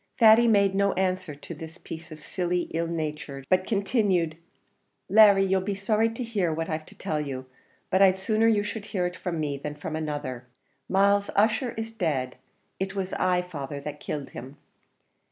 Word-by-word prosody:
Thady 230 0 +7
made 200 -3 +4
no 200 0 +2
answer 185 -4 -1
to 145 +4 -9
this 160 +2 -9
piece 165 -2 -9
of 155 -1 -10
silly 180 -1 -1
ill 165 +1 0
nature, 150 -4 -4
but 185 0 +2
continued 200 -6 +1 0.7
"Larry, 200 -1 +7
you'll 190 0 +2
be 200 +1 -2
sorry 215 +3 +1
to 230 +3 -5
hear 205 -8 0
what 165 +1 -2
I've 155 0 -3
to - - -14
tell 150 -1 -2
you, 130 -3 -5 0.5
but 190 - +3
I'd 190 -1 +6
sooner 215 +3 +2
you 210 -2 +3
should 210 0 -5
hear 180 -3 -1
it 180 0 -3
from 175 -3 -4
me 145 -2 -1
than 150 +1 -6
from 150 +1 -5
another. 145 -5 -4 0.4
Myles 200 +1 +3
Ussher 225 +4 +2
is 225 0 -4
dead; 150 - -2 0.4
it 190 +1 -3
was 190 -1 -3
I, 180 -1 +1
father, 145 -5 -6
that 150 0 -6
killed 145 -2 -5
him." 130 +4 -9
185 Hz, 185 wpm, -27 LUFS, 155-200 Hz, 0.7 s, Thady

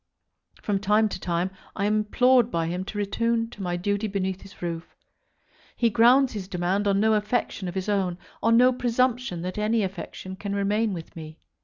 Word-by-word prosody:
From 200 -2 0
time 210 +2 +3
to - - -5
time 175 +1 -1 0.2
I 200 - -1
am 210 +1 +2
implored 245 +4 +3
by 165 -1 -1
him 175 +3 -3
to 205 - -6
return 230 +3 0
to 210 - -10
my 175 -2 -2
duty 205 +4 -1
beneath 190 -2 -2
his 195 - -14
roof. 170 -1 -5 0.8
He 235 -2 +2
grounds 245 +5 +5
his 200 -4 -5
demand 190 +2 -1
on 200 0 +3
no 220 +1 +3
affection 210 -2 -1
of 175 - -5
his 190 +1 -3
own, 190 -4 0 0.2
on 230 +1 +4
no 250 +1 +6
presumption 245 -6 0
that 185 +3 -4
any 215 +1 +1
affection 190 0 -6
can 200 0 -4
remain 205 +2 +1
with 165 -2 -9
me. 155 -1 -9
205 Hz, 190 wpm, -25 LUFS, 185-225 Hz, 0.8 s, no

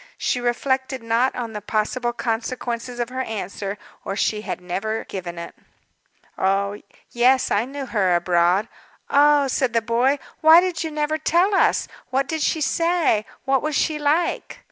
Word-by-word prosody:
She 245 - -1
reflected 260 +1 -1
not 230 +3 +1
on 235 -3 -4
the 210 - -5
possible 220 +4 -1
consequences 240 +1 -3
of 240 0 -1
her 260 +1 -3
answer, 200 -3 -4 0.3
or 195 - -4
she 210 +1 0
had - - -5
never 195 +5 -3
given 175 -3 -6
it. 170 - -7 1.6
"Yes, 255 +2 +3
I 210 +3 +2
knew 275 +1 -6
her 195 -7 +1
abroad." 175 +4 +2 0.4
"Oh!" 290 0 +5
said 260 -2 0
the 230 - +2
boy. 245 +5 +2 0.2
"Why 320 +2 +8
did 360 -2 -1
you 320 - -3
never 305 0 -1
tell 350 +6 +2
us? 385 - +3 0.2
What 265 +1 0
did 320 0 -3
she 315 - +1
say? 330 -9 +1 0.2
What 270 -1 +2
was 305 -1 -2
she 305 +1 +1
like?" 310 +10 0
250 Hz, 160 wpm, -22 LUFS, 220-290 Hz, 1.6 s, Why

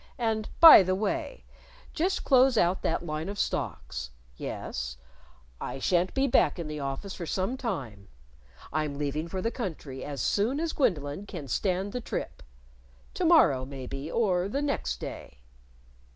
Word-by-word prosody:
And 220 -3 -1
by 325 -10 +11
the 185 0 +1
way, 295 - -3 0.5
just 365 +3 0
close 260 -2 +5
out 180 -1 +2
that 165 - -1
line 155 +2 -3
of 205 - -5
stocks. - - -3 0.3
Yes.... - - -5 0.6
I - - -4
shan't 175 +6 +1
be 270 0 +3
back 180 - +3
in 170 -3 -5
the 150 0 -5
office 140 +8 -4
for 170 - -6
some 190 +9 -1
time. 135 - -5 0.7
I'm 150 -2 -1
leaving 150 +2 -2
for 185 +2 -4
the 230 - 0
country 155 - -6
as 145 -2 -5
soon 220 - +1
as 330 0 -1
Gwendolyn 180 - -1
can 165 -8 -7
stand 190 - -1
the 250 - -3
trip. - - -5 0.7
To 365 - -1
morrow, 310 - +5
maybe, 135 +2 -6
or 190 -3 +1
the 280 +6 -1
next 65 - -2
day.... - - -8
185 Hz, 155 wpm, -28 LUFS, 145-235 Hz, 0.7 s, by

